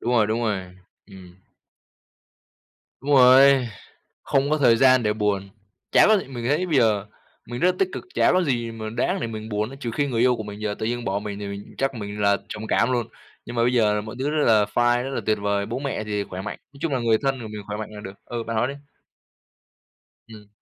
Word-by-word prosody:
đúng 120 - -1
rồi, 115 -3 +4
đúng 110 +2 -1
rồi, 95 -5 -3 0.3
ừm. 95 -3 -14 1.6
Đúng 140 - -4
rồi, 135 -1 +6 0.6
không 135 +1 +1
có 155 - +2
thời 125 -6 +5
gian 130 0 +5
để 105 - +1
buồn, 100 -2 -1 0.4
chả - - +6
có 215 -1 +5
gì - - -5
mình 120 -3 -6
thấy 150 +7 +1
bây 160 -6 +1
giờ, 110 -5 +2 0.4
mình 120 +1 -5
rất 180 - +3
là - - -12
tích 195 - +3
cực, - - -5
chả - - +4
có 185 0 +3
gì 120 -6 -1
mà 110 -1 -6
đáng 125 - -1
để - - -2
mình 110 -1 -7
buồn 105 +1 -1
á, 135 - -10
trừ 120 -5 -4
khi 145 +4 0
người 120 -4 -1
yêu 125 0 +4
của 110 - -6
mình 105 0 -9
giờ 105 -1 -2
tự - - -2
nhiên 120 +1 -2
bỏ 100 +1 -1
mình 105 -1 -6
thì 100 - -5
mình 100 0 -8
chắc 135 0 0
mình 105 -2 -6
là 100 0 +3
trầm 110 +1 -6
cảm 120 - +2
luôn, 120 -3 0 0.4
nhưng - - -7
mà 115 - +1
bây 125 +1 +2
giờ 105 -3 +2
mọi 110 +2 -8
thứ 135 +3 0
rất 150 0 +1
là 110 -2 +5
fine 120 0 +2
rất 135 - -4
là 135 - -3
tuyệt 110 - +2
vời, 100 0 0
bố 115 +4 -4
mẹ 135 -5 -3
thì 105 -1 -2
khỏe 95 -1 -7
mạnh, 105 - -6 0.2
nói - - -15
chung 165 -4 -1
là 130 - 0
người 115 -2 +3
thân 135 -1 0
của 110 - -6
mình 105 -1 -7
khỏe 105 0 -4
mạnh 110 - -6
là 105 -1 -9
được 95 -1 -8
ừ, 120 -1 -4
bạn 115 0 -4
nói 115 +3 +1
đi. 135 - -4 1.6
Ừm. 105 -2 -13
115 Hz, 255 wpm, -23 LUFS, 105-130 Hz, 1.6 s, rồi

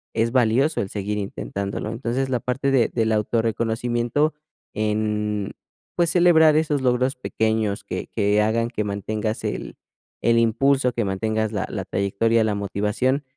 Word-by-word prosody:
es 115 +1 +1
valioso 130 +5 +2
el 95 - -4
seguir 105 +1 -3
intentándolo. 100 - -4
Entonces, 120 +3 -2
la 125 -2 0
parte 135 +3 -1
de 125 -4 +3
del 115 -2 0
autorreconocimiento 115 +5 0 0.4
en, 105 -1 -1 0.4
pues, 170 -2 +2
celebrar 160 -3 +5
esos 150 -3 +1
logros 125 +1 +1
pequeños 110 -4 -1
que - - -5
que 105 -1 +1
hagan 115 +2 +1
que 110 -3 -2
mantengas 105 +2 -3
el - - -4 0.4
el 115 0 +3
impulso, 125 +3 +2
que 115 -3 -1
mantengas 110 +3 -1
la 105 - -1
la - - -4
trayectoria, 110 +4 +1
la 105 -2 0
motivación, 105 +8 -1
115 Hz, 145 wpm, -23 LUFS, 105-125 Hz, 0.4 s, celebrar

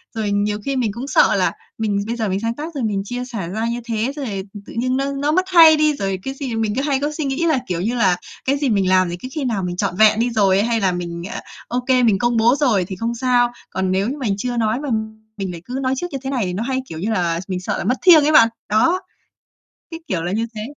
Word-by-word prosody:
Rồi 210 -2 -1
nhiều 205 +1 0
khi 275 -1 -1
mình 235 -5 0
cũng 250 +4 -6
sợ - - +4
là - - +2 0.3
mình 210 -3 0
bây 235 - -2
giờ 220 -4 -2
mình 190 +1 -1
sáng 230 +1 -2
tác 320 +3 -6
rồi 265 - -2
mình 200 -3 0
chia 245 +3 -4
sẻ 220 -9 -5
ra 220 +4 -2
như 235 +1 -2
thế, 230 +2 -1
rồi, 285 -3 -4 0.3
ừm, 205 -1 -10
tự - - -11
nhiên 255 +2 0
nó 275 +1 -1
nó 285 +2 0
mất 370 +3 +2
hay 325 -3 +8
đi, 305 0 +3
rồi, 195 -5 -2
cái 270 - -4
gì 265 -5 -5
mình 220 -2 0
cứ 270 - 0
hay 280 -2 0
có 295 +2 -1
suy 305 - -2
nghĩ 275 +5 -1
là, 310 -6 +2
kiểu 175 -1 -2
như 230 +5 -1
là, 190 -6 +3 0.3
cái 275 +2 +1
gì 280 -3 0
mình 195 -3 +2
làm 185 -1 +3
thì 175 - -5
cứ 255 - -7
khi 295 - -2
nào 210 -6 -1
mình 175 0 -3
trọn 195 -2 -1
vẹn 215 0 +5
đi 240 +1 +2
rồi 200 -4 +3
ấy 210 - +2
hay 230 -1 +1
là 190 -2 +2
mình, 170 -1 -5
ờ, - - -4 0.3
OK, 250 +2 -3 0.2
mình 200 -4 +3
công 240 -1 +1
bố 235 +4 +4
rồi 230 -11 +2
thì 190 - -6
không 230 +4 -3
sao, 245 -1 +2 0.2
còn 190 0 -1
nếu 195 +5 +1
như 285 - -4
mình 215 -8 -1
chưa 245 +2 -3
nói 225 +2 +1
mà 290 -2 -4 0.5
mình 190 -2 -3
lại 170 -1 -8
cứ 255 +2 -4
nói 260 0 0
trước 355 - -3
như 275 - -3
thế 265 - -3
này 250 -7 -1
thì 180 - -3
nó 200 +5 -2
hay, 260 +1 -1
kiểu 160 -1 -6
như 210 +6 -2
là, 170 -4 0
s 190 - -15
mình 185 -1 -2
sợ 185 - -3
là - - -3
mất 250 - +1
thiêng 330 -5 +7
ấy 305 - +3
bạn, 230 -6 +7 0.2
đó, 330 - +3 0.9
cái 330 - -7
kiểu 175 -4 -1
là 175 +2 -3
như 225 +2 0
thế. 210 - -5
230 Hz, 300 wpm, -20 LUFS, 195-270 Hz, 0.9 s, hay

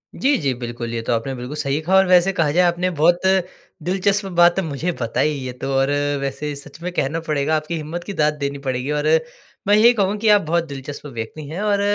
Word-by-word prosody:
जी, 280 +1 +2
जी, 140 -5 0
बिल्कुल 120 -1 -6
ये 115 - -2
तो 115 - -1
आपने 115 +4 -2
बिल्कुल 125 +4 -6
सही 140 -1 -1
कहा 185 +4 +1
और 190 0 +6
वैसे 180 +1 +5
कहा 160 -5 +1
जाए 180 +4 +3
आपने 175 +1 +1
बहुत 175 +2 +4 0.6
दिलचस्प 195 +3 +1
बात 175 +2 +5
मुझे 160 +2 -2
बताई 115 +6 +1
ये 130 -3 -5
तो 135 - -2
और 135 +1 +2 0.3
वैसे 145 +2 -3
सच 140 +3 -12
में 180 - -3
कहना 150 +1 -1
पड़ेगा 155 -1 0
आपकी 155 +2 -2
हिम्मत 160 +3 -5
की, 200 - -6
दाद 150 -3 +2
देनी 140 -1 -4
पड़ेगी 130 +2 -1
और 150 0 0 0.6
मैं 205 - +5
ये 225 +3 +7
कहूँ 205 -1 0
कि 215 +1 +1
आप 205 -1 +6
बहुत 170 +1 0
दिलचस्प 140 +1 -8
व्यक्ति 115 +7 -6
हैं 170 +5 -5
और 205 -1 +1
155 Hz, 220 wpm, -21 LUFS, 140-180 Hz, 0.6 s, ये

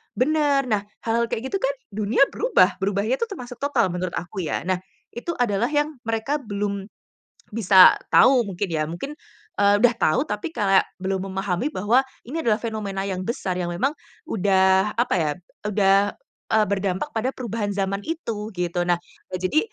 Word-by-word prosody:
bener. 290 0 +2
Nah 210 -4 +1 0.2
hal-hal 230 +1 +1
kayak 255 +4 -3
gitu 390 - 0
kan - - 0 0.2
dunia 215 +6 +2
berubah, 300 - +2
berubahnya 205 +6 0
itu 465 - 0
termasuk 250 -9 -8
total 245 -9 +2
menurut 180 0 -3
aku 185 +1 -4
ya. 155 - -2
Nah 185 -1 +1 0.4
itu 240 +8 -3
adalah 230 -1 +1
yang 295 +1 0
mereka 225 +6 -1
belum 200 -3 -3 0.7
bisa 195 -4 +7 0.2
tahu 255 -2 +6
mungkin 195 +1 -3
ya, 155 -1 0
mungkin, 175 - -5 0.5
eee, 200 0 +5
udah 245 0 +5
tahu - - +3
tapi 210 +7 -4
kayak, 195 -2 +3 0.2
belum 190 0 -2
memahami 195 +4 -1
bahwa 215 +7 +3 0.2
ini 295 +7 -5
adalah 230 -9 +2
fenomena 215 -4 -3
yang 190 -2 -3
besar, 190 -6 -2
yang 175 - -2
memang 260 +11 +1 0.4
udah 190 0 +3
apa 240 -1 +1
ya, 155 -2 +1 0.4
udah, 200 -1 +3 0.4
eee, 220 -1 +4
berdampak 195 +5 -1
pada 250 +4 -1
perubahan 225 -4 -3
zaman 195 0 -1
itu 225 -10 -4
gitu. 175 0 -1
Nah, 175 - +4 0.4
eee, 185 - -2
jadi 185 +12 +2
210 Hz, 165 wpm, -23 LUFS, 190-245 Hz, 0.7 s, bisa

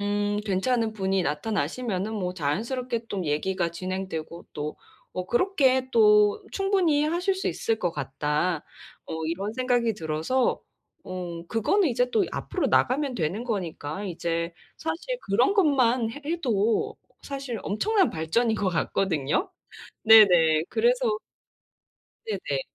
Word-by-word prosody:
음 205 0 0
괜찮은 220 +3 +1
분이 195 -2 0
나타나시면은 195 - -2
뭐 185 -3 -3
자연스럽게 230 - -2
또 190 -3 -3
얘기가 170 +4 -1
진행되고 175 -2 -5
또 150 +1 -4 0.4
뭐 180 0 -3
그렇게 260 - +2
또 210 -3 +5
'충분히 380 -7 +2
하실 355 +5 0
수 380 - -2
있을 225 -1 -1
것 175 -5 0
같다.' 150 +3 -1 0.4
어 160 0 -4
이런 190 +6 -3
생각이 245 -3 +1
들어서 160 +10 0 0.4
어 175 -2 -6
그거는 335 - +2
이제 245 0 +1
또 400 - +2
앞으로 - - -2
나가면 275 0 +2
되는 185 +4 -2
거니까 190 -5 -4
이제 170 -2 -2 0.2
사실 345 +11 -4
그런 240 - +2
것만 255 - +3
해 290 - -9
해도 235 - 0 0.3
사실 275 -4 -5
엄청난 390 - +1
발전인 220 +9 0
것 200 -3 0
같거든요. 175 - 0 0.5
네네, 175 -8 +7
그래서 475 -1 +2 1.1
네네. - - -2
210 Hz, 265 characters per minute, -26 LUFS, 175-260 Hz, 1.1 s, 네네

